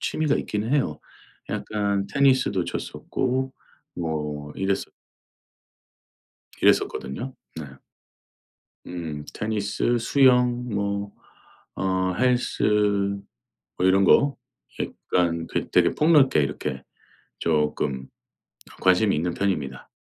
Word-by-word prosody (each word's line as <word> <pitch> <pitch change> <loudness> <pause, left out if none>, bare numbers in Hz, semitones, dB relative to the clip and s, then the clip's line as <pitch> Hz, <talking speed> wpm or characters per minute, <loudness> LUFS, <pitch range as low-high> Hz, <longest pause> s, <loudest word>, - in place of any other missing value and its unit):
취미가 155 -2 0
있기는 110 +6 -2
해요. 80 - 0 0.5
약간 100 -2 -1
테니스도 130 -8 +2
쳤었고 130 +1 -2 0.4
뭐 75 -3 -4
이랬었 95 0 -1 1.7
이랬었거든요. 120 - +1 0.2
네. 80 - -5 1.2
음 80 -4 -5
테니스 110 +2 -1
수영 125 -1 +3
뭐 100 0 -2 0.6
어 95 -1 0
헬스 125 +3 +1 1.2
뭐 90 - +1
이런 95 +1 +4
거 140 +8 +4 0.4
약간 85 -2 -1
되 - - -3
되게 - - +4
폭넓게 150 - +4
이렇게 65 -1 -3 0.6
쪼끔 75 -4 0 0.7
관심이 95 +3 +4
있는 85 +3 -1
편입니다. 75 -10 -2
100 Hz, 190 characters per minute, -24 LUFS, 80-125 Hz, 1.7 s, 이런